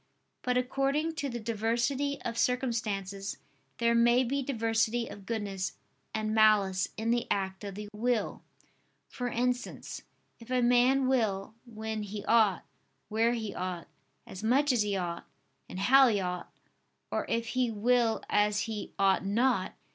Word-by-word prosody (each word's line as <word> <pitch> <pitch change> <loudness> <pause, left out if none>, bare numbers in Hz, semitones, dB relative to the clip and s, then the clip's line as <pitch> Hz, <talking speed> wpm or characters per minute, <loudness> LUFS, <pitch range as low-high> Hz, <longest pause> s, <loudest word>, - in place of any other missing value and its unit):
But 250 0 0
according 275 +5 0
to 285 - -2
the 240 -1 -4
diversity 235 +6 -1
of 230 - -3
circumstances 215 -6 -1 0.4
there 235 0 +2
may 240 +2 +4
be 275 +3 -1
diversity 230 -2 0
of 195 -1 -11
goodness 200 -4 -3 0.4
and 215 0 -2
malice 205 -3 +4
in 225 +1 0
the 240 0 0
act 190 0 -1
of 200 -2 -6
the 210 +1 -6
will: 225 0 -1 0.7
for 245 - -4
instance, 245 +1 -2 0.4
if 230 +1 -14
a 255 -1 +2
man 250 +2 +4
will, 220 -6 0
when 220 -1 -4
he 205 0 -6
ought, 220 -5 +3 0.4
where 225 +2 +2
he 220 -4 -3
ought, 180 -2 -4 0.4
as 190 - -9
much 270 +6 +3
as 245 -3 +2
he 205 -1 0
ought, 170 -2 -4 0.4
and 185 - -6
how 265 +6 +7
he 215 -4 +2
ought, 180 -1 -4 0.6
or - - -1
if 230 0 -1
he 255 -2 +1
will 230 0 +2
as 205 0 +2
he 220 -2 -5
ought 195 -1 +3
not. 205 0 +1
225 Hz, 150 wpm, -30 LUFS, 205-245 Hz, 0.7 s, how